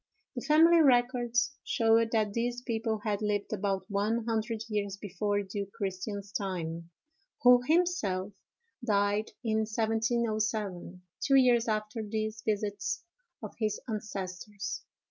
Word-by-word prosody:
The 245 - -3
family 325 +3 +6
records 245 -1 +3
showed 225 -1 +3
that 215 -3 +1
these 240 +2 -2
people 225 -3 -1
had 210 -1 -1
lived 210 0 -1
about 195 -2 -1
one 215 +3 0
hundred 225 -1 -1
years 205 -3 -2
before 205 +1 -1
Duke 200 0 -5
Christian's 200 0 -4
time, 170 -4 -3 0.5
who 245 0 +8
himself 260 - +1 0.5
died 205 -1 +1
in 220 -2 +1
1707, 220 -4 -1 0.2
two 275 - +4
years 245 -3 +5
after 215 +1 -1
these 215 0 -3
visits 205 - -2 0.4
of - - -6
his 215 -2 0
ancestors. 205 -2 -5
215 Hz, 120 wpm, -30 LUFS, 200-235 Hz, 0.5 s, who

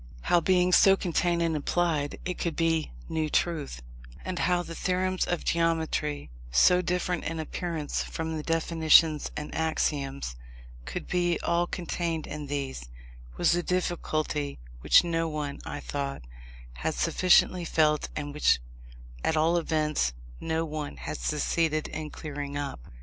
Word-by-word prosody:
How, 175 - +3
being 180 +1 +3
so 195 +2 +7
contained 175 -1 +1
and 165 -1 +1
implied, 150 -1 0
it 180 -1 -3
could 170 -2 -1
be 165 -1 +1 0.2
new 155 -1 -1
truth, 150 - -1 0.4
and 185 -1 -3
how 180 -1 +2
the 165 - -8
theorems 185 +1 0
of 175 - -2
geometry, 160 - 0 0.2
so 180 - +5
different 180 0 -1
in 165 0 -3
appearance 160 -1 -3
from 160 0 -4
the 155 - -3
definitions 160 -1 +4
and 150 0 -5
axioms, 140 - -1 0.5
could - - -5
be 175 -2 +1
all 170 +1 +1
contained 170 -2 -3
in 150 -1 -6
these, 135 - -4 0.5
was - - +3
a 175 - +1
difficulty 155 -5 -1 0.2
which - - +6
no, 165 -1 0
one, 150 -2 -4
I 145 - -5
thought, 140 - -4 0.5
had 60 - -2
sufficiently 180 - +3
felt, 155 -2 +2
and 145 -1 -4
which, 150 - +4 0.7
at 160 - +1
all 160 +2 +3
events, 155 - +1 0.3
no 160 0 -1
one 150 - -5
had - - -5
succeeded 155 - 0
in 155 0 -5
clearing 145 -2 -5
up. 145 - -4
160 Hz, 145 wpm, -28 LUFS, 150-175 Hz, 0.7 s, so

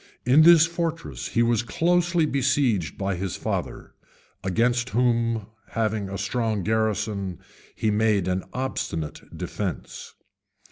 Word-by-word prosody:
In 130 +5 +6
this 165 0 +8
fortress 165 -1 -3
he 120 - +2
was 115 -1 +2
closely 170 - +1
besieged 130 - +1
by 100 0 -1
his 95 0 -3
father, - - -4 0.5
against 120 +6 +1
whom 115 -3 +1 0.3
having 110 -3 -1
a 100 - -4
strong 110 0 -1
garrison, 105 -3 -1 0.4
he 110 - 0
made 105 -3 +2
an 95 0 0
obstinate 80 - -3 0.2
defence. - - -5
115 Hz, 120 wpm, -25 LUFS, 100-130 Hz, 0.5 s, this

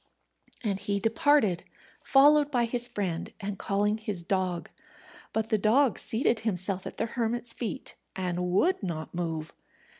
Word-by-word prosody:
And 200 -4 -1
he 200 0 -1
departed, 225 - +2 0.4
followed 290 +2 +5
by 245 -4 +1
his 240 +1 +1
friend, 185 -8 -3
and 200 -1 -5
calling 205 +2 0
his 205 -5 -4
dog. 185 -1 -1 0.6
But 220 0 -1
the 215 - +2
dog 235 +5 +3
seated 225 0 +3
himself 190 -3 -2
at - - -9
the - - 0
hermit's 240 0 -2
feet, 220 -8 -5 0.2
and 180 -1 -2
would 340 - +2
not 165 -5 -5
move. 165 -2 -3
210 Hz, 145 wpm, -28 LUFS, 180-240 Hz, 0.6 s, followed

